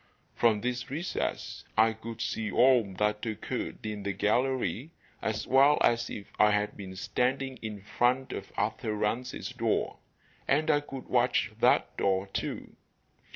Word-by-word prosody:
From 110 -3 +3
this 125 +1 -2
recess 160 +7 -3
I 110 +1 +5
could 115 +1 -8
see 110 -1 -2
all 125 -6 +4
that 105 0 0
occurred 110 -1 -4
in 105 -1 -4
the 100 0 -2
gallery 120 - 0 0.3
as 110 0 -2
well 140 +3 +5
as 120 0 +3
if 100 - -6
I 105 - +7
had 105 0 0
been 95 -2 -8
standing 130 +7 -1
in 105 -3 -6
front 125 +6 +1
of - - -7
Arthur 110 - -1
Rance's 115 +6 -2
door, 115 -3 -1 0.5
and 155 +3 +3
I 145 - +4
could 135 -3 -9
watch 120 -1 +2
that - - +3
door, 95 0 +1
too. 95 - -5
115 Hz, 150 wpm, -29 LUFS, 105-130 Hz, 0.5 s, I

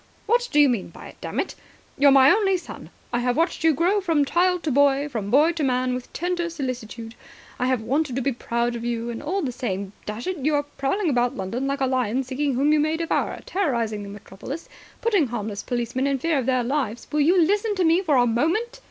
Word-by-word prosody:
"What 485 +2 +1
do 295 - +3
you 290 - +7
mean 235 -7 -1
by - - -12
it, - - -15
damn - - -4
it? - - -2 0.4
You're 285 0 +5
my 270 0 +7
only 395 -3 +3
son. 355 - -10 0.2
I 240 - +2
have 245 +1 0
watched 330 0 0
you 325 - +5
grow 350 +8 +1
from 325 -6 +2
child 360 +3 +1
to 310 - -1
boy, 280 +1 +3
from 220 -8 -4
boy 295 +8 +5
to 330 -3 -3
man, 255 -1 +1
with 250 0 -6
tender 350 0 -2
solicitude. 245 -7 -5 0.5
I 250 - +1
have 255 -3 +1
wanted 275 +2 0
to 265 - -1
be 275 - +1
proud 235 0 -2
of 235 - -5
you. 235 0 -2
And 230 - -6
all 370 +5 -2
the 255 -4 -2
time, 200 -5 -4
dash 210 +3 -5
it, 370 -1 -2
you 295 +3 +1
are 290 - +1
prowling 290 +5 -1
about 245 -1 +1
London 230 +8 -3
like 275 0 -2
a - - +3
lion, 255 -1 0
seeking 265 +1 -2
whom 285 +4 +3
you 305 - +3
may 310 +2 +1
devour, 335 0 -1
terrorising 235 - -1
the 200 - -8
metropolis, 205 - -8 0.3
putting 405 - +2
harmless 215 -3 -4
policemen 245 +2 -2
in 275 -1 +1
fear 310 +2 0
of 255 - -3
their 255 -2 +2
lives.. 240 -3 -2
." - - -32
"Will 300 0 +1
you 350 +6 +4
listen 410 +5 +2
to 375 - +1
me 335 +2 +4
for 315 -7 +1
a 245 -1 +5
moment?" 340 - 0
275 Hz, 240 wpm, -24 LUFS, 240-330 Hz, 0.5 s, you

